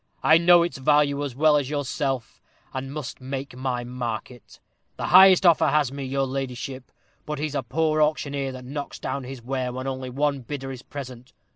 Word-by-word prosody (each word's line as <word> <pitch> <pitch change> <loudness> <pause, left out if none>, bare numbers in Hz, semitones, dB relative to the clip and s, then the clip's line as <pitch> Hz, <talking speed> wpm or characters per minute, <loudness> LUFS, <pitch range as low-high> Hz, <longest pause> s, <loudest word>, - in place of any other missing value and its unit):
I 155 +1 +6
know 175 0 +6
its 170 -5 -4
value 145 +1 +3
as 135 -4 -5
well 150 +1 +4
as 140 -2 -2
yourself, 135 -3 -3 0.3
and 135 0 -5
must 145 -2 -6
make 135 0 -5
my 125 -1 -2
market. 120 -1 -6 0.4
The - - -3
highest 190 0 +8
offer 170 -2 +5
has 145 -2 +2
me, 140 0 -6
your 135 +1 0
ladyship; 130 -1 -5 0.5
he's 150 0 -3
but - - 0
a - - -2
poor 155 +5 0
auctioneer 140 -3 0
that 130 -1 -9
knocks 140 +2 -6
down 135 -2 -4
his 130 -2 -8
ware 130 0 -2
when 130 +1 -5
only 130 -1 -4
one 140 +2 0
bidder 135 +2 -6
is 130 -2 -8
present. 130 -3 -9
135 Hz, 185 wpm, -24 LUFS, 130-150 Hz, 0.5 s, highest